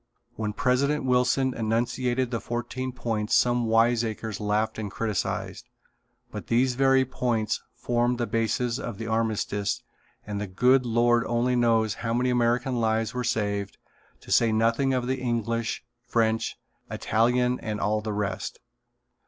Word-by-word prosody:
When 110 -1 -3
President 135 +5 +1
Wilson 125 +1 +2
enunciated 120 +3 0
the 115 -3 -2
fourteen 120 +3 -4
points 115 -4 -1
some 120 -1 +3
wiseacres 115 -2 +1
laughed 105 +1 0
and 105 -2 -3
criticised, 105 -1 -3 0.6
but - - -7
these 125 +2 +2
very 135 +1 +4
points 120 -4 -1
formed 120 0 0
the 120 - 0
basis 115 +2 0
of 115 -7 -5
the 115 - -5
armistice 110 -3 -1 0.4
and 105 -1 -4
the 105 - -3
Good 125 +7 +3
Lord 120 0 +3
only 120 +2 +1
knows 115 -3 +2
how 115 -1 -1
many 125 +1 +1
American 120 +1 +1
lives 110 0 0
were 125 0 -2
saved 100 -4 -1 0.4
to - - -11
say 115 -1 +4
nothing 115 +5 +2
of 125 -1 0
English, 115 -4 -1 0.2
French, 115 -1 +1 0.3
Italian 125 +3 +1
and 105 -1 -4
all 105 +1 0
the 110 0 -4
rest. 100 -2 -3
115 Hz, 140 wpm, -26 LUFS, 110-125 Hz, 0.6 s, very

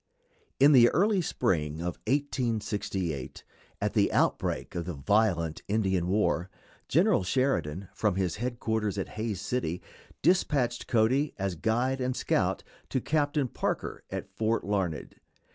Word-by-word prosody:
In 140 +2 +7
the 125 -4 +8 0.3
spring 80 - 0
of 85 +1 -4
1868, 110 - -2 0.4
at - - -1
the - - +3
outbreak - - 0
of 85 -2 -3
the 90 -2 -4
violent 85 0 +1
Indian 95 -4 +1
war, 95 -2 +1 0.4
General 175 - +3
Sheridan, 95 - 0
from 105 -4 0
his 95 -2 -1
headquarters 110 -3 -2
at 95 - -3
Hays 110 -3 -3
City, 105 -6 -2 0.4
dispatched 140 -8 +2
Cody 130 +6 +2
as 95 -1 -1
guide 120 +9 0
and 130 0 -1
scout - - 0 0.3
to 130 - 0
Captain 145 0 0
Parker - - -3
at - - -5
Fort 110 +1 0
Larned. 95 -6 -2
110 Hz, 125 wpm, -29 LUFS, 90-130 Hz, 0.4 s, the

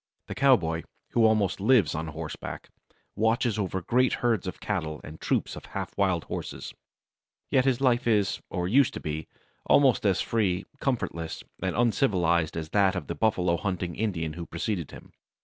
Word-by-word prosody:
The - - -6
cowboy, 90 -12 +3 0.3
who 115 -2 +4
almost 110 -4 +2
lives 105 - +4
on 80 +1 -3
horseback, 80 0 -7 0.5
watches 110 +1 +1
over 95 -2 -2
great 125 +6 +2
herds 115 -6 0
of 90 - -5
cattle 80 -7 -3
and 75 +1 -10
troops - - 0
of - - -9
half - - -5
wild 95 -4 +1
horses. - - -6 0.8
Yet 130 -1 +4
his 135 -1 +2
life 125 -2 +2
is, 105 -4 +2
or 90 -1 -2
used 130 +6 +3
to - - -4
be, 75 0 -4 0.4
almost 135 -4 +5
as 100 -3 +2
free, 100 -5 0
comfortless, 85 - -2 0.2
and 95 -1 -1
uncivilized 90 - +2
as 80 -1 -4
that 100 -1 +3
of 90 - -3
the - - -4
buffalo 90 -6 +1
hunting 90 -3 -3
Indian 85 -8 -2
who 85 0 -7
preceded 85 0 -3
him. - - -13
95 Hz, 165 wpm, -27 LUFS, 85-115 Hz, 0.8 s, almost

